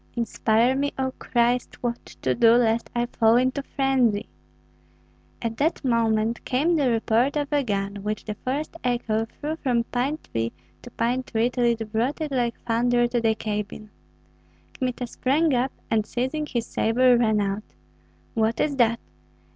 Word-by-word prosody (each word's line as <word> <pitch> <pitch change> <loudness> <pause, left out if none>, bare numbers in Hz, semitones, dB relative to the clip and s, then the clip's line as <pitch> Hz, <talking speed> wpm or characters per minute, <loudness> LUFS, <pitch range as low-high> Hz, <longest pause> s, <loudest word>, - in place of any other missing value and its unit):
"Inspire 235 +1 +2
me, 285 +1 0
O 260 -1 -1
Christ, 240 0 +1
what 235 -1 -2
to - - -2
do, 230 -1 +5
lest 230 -1 +2
I 240 0 +1
fall 230 -2 +3
into 255 +3 +2
frenzy." 265 -7 +1 1.2
At 225 -1 -2
that 300 0 0
moment 230 -2 +1
came 300 +7 +1
the 285 -5 +2
report 230 +4 +2
of 290 0 -2
a 290 -1 +3
gun, 200 -3 -2
which 210 +2 -4
the 215 - -3
forest 275 +9 -4
echo 235 -3 0
threw 305 +7 -5
from 245 -6 +1
pine 255 +6 -1
tree 115 0 -3 0.3
to 245 - -10
pine 240 +2 0
tree 235 0 0
till 245 -1 0
it 225 -2 0
brought 235 +8 0
it 310 -2 -3
like 240 -3 -1
thunder 240 +1 +2
to 240 -1 0
the 225 -1 +2
cabin. 210 0 -5 0.8
Kmita 250 -1 -2
sprang 280 +6 +1
up, 255 +2 +1 0.2
and 220 -1 +3
seizing 260 +7 -2
his 235 -4 -2
sabre 245 +3 +3
ran 220 -3 +2
out. 200 - -3 0.6
"What 225 +1 +1
is 285 -2 0
that?" 235 -2 +3
240 Hz, 165 wpm, -25 LUFS, 225-260 Hz, 1.2 s, do